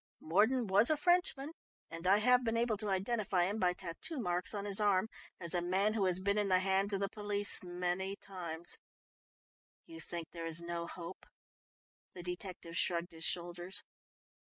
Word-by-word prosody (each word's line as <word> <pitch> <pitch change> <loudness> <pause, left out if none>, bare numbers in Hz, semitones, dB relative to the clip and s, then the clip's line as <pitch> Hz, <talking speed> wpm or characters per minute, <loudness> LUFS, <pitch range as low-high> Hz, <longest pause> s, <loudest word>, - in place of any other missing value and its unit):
"Mordon 220 +10 +3
was 205 +3 +5
a 310 - +3
Frenchman 335 -4 +2 0.4
and 165 +2 -5
I 195 +2 +6
have 250 +3 +4
been 230 -1 0
able 230 -1 +2
to 210 +1 -2
identify 195 -1 +1
him 205 +4 -2
by 180 -2 +3
tattoo 180 - -6
marks 180 -5 0
on 205 -1 -2
his 200 0 +2
arm, 200 -1 +3 0.3
as 170 -3 -3
a 175 - +1
man 190 +4 +2
who 210 -3 +1
has 185 -1 +1
been 200 +2 +1
in 205 - +1
the 185 -1 +4
hands 195 +1 +2
of 195 - +2
the 200 - 0
police 205 -1 +2
many 180 +2 -2
times." 175 -4 -6 1.1
"You 330 -1 -10
think 170 -2 -6
there 165 -1 -5
is 165 0 -2
no 170 0 -4
hope?" 170 +1 -8 0.9
The 175 - -7
detective 180 -1 -6
shrugged 170 +1 +1
his 160 -1 -5
shoulders. 175 +1 -3
190 Hz, 175 wpm, -35 LUFS, 175-210 Hz, 1.1 s, I